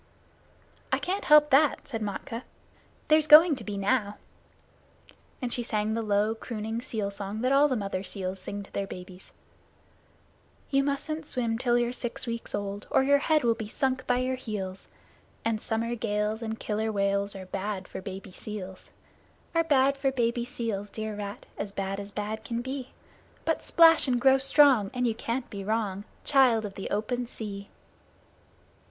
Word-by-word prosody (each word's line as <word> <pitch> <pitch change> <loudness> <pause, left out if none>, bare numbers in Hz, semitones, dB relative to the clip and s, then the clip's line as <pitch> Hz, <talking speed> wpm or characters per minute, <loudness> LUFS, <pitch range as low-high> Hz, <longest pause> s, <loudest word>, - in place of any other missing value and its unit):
"I - - +3
can't 390 +3 -2
help 300 0 +6
that," 280 +2 +4
said 225 -4 -4
Matkah; 210 +3 -4 0.7
"there's 310 0 +4
going 310 +1 +9
to 235 - -7
be 205 -1 -4
now." 205 0 0 1.3
And 240 - -1
she 245 - +1
sang 215 -2 -1
the 230 - -1
low, 210 0 +1
crooning 225 0 -5
seal 215 -4 -3
song 200 +2 -5
that 255 +2 +1
all 280 +2 +6
the 260 - 0
mother 195 -4 -2
seals 190 -1 -3
sing 200 +2 -5
to - - -17
their 200 -1 -2
babies: 180 0 -10 1.4
You 275 0 +3
mustn't 295 +2 -3
swim 235 -3 -1
till 240 -1 +2
you're 240 0 +1
six 245 -1 -4
weeks 230 -1 -3
old, 200 0 -4
Or - - +3
your 285 +1 +4
head 310 0 +2
will 235 -1 +4
be 220 -2 -6
sunk 260 +3 -1
by 245 - +3
your 255 +1 -1
heels; 195 -6 -5 0.6
And 225 -1 0
summer 230 +1 -1
gales 215 -1 -1
and 225 -1 -4
Killer 220 +1 -1
Whales 200 0 0
Are 190 -1 -7
bad 195 0 -4
for - - -7
baby 195 0 -8
seals. 190 -1 -8 0.6
Are 330 0 +3
bad 275 -3 +3
for 275 -1 +1
baby 235 -2 0
seals, 220 -4 -4
dear 220 0 -4
rat, 205 0 -6
As 200 -1 -3
bad 195 0 -3
as 200 0 -6
bad 210 +1 -4
can 235 +1 -3
be; 260 0 -5 0.6
But - - 0
splash 330 -3 +6
and 245 -2 +2
grow 265 +1 +5
strong, 270 -6 +5
And 250 0 +1
you 230 - +2
can't 240 +3 -3
be 200 -2 -5
wrong. 205 -2 -1 0.2
Child 250 -6 +4
of 200 - -6
the 195 - -6
Open 240 +4 -1
Sea! 200 -4 -7
225 Hz, 175 wpm, -28 LUFS, 200-260 Hz, 1.4 s, going